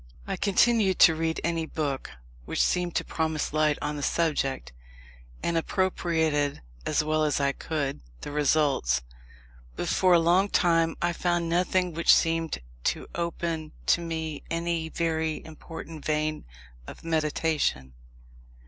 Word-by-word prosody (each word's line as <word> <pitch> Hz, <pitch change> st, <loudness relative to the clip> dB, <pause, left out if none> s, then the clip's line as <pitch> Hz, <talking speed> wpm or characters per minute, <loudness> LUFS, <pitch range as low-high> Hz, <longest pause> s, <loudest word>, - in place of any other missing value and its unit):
I -, -, -2 dB
continued 205 Hz, -1 st, +3 dB
to 165 Hz, -, +9 dB
read 160 Hz, 0 st, -1 dB
any 165 Hz, -1 st, -1 dB
book 145 Hz, -5 st, -3 dB, 0.4 s
which -, -, -3 dB
seemed 175 Hz, -1 st, 0 dB
to -, -, +1 dB
promise 160 Hz, -2 st, -2 dB
light 155 Hz, -1 st, +2 dB
on 150 Hz, -, -2 dB
the -, -, -4 dB
subject, 140 Hz, -, 0 dB, 0.7 s
and 170 Hz, -, 0 dB
appropriated, 160 Hz, -, 0 dB, 0.2 s
as -, -, +2 dB
well 155 Hz, 0 st, +1 dB
as 150 Hz, -2 st, +1 dB
I 140 Hz, 0 st, +2 dB
could, 140 Hz, -1 st, -3 dB, 0.2 s
the -, -, -6 dB
results; 140 Hz, -, +2 dB, 0.7 s
but -, -, -3 dB
for 185 Hz, -2 st, +4 dB
a -, -, +6 dB
long 180 Hz, +4 st, +3 dB
time 165 Hz, -3 st, +2 dB
I 175 Hz, 0 st, +1 dB
found 175 Hz, 0 st, 0 dB
nothing 180 Hz, +1 st, +1 dB
which 170 Hz, +1 st, +4 dB
seemed 165 Hz, -1 st, 0 dB, 0.3 s
to -, -, 0 dB
open 165 Hz, -2 st, -3 dB
to 170 Hz, -, +3 dB
me 160 Hz, -3 st, -4 dB
any 165 Hz, -1 st, -1 dB
very 160 Hz, -1 st, -1 dB
important 160 Hz, 0 st, -9 dB
vein 155 Hz, 0 st, -1 dB, 0.4 s
of -, -, -10 dB
meditation. 155 Hz, -, 0 dB
160 Hz, 140 wpm, -27 LUFS, 150-170 Hz, 0.7 s, to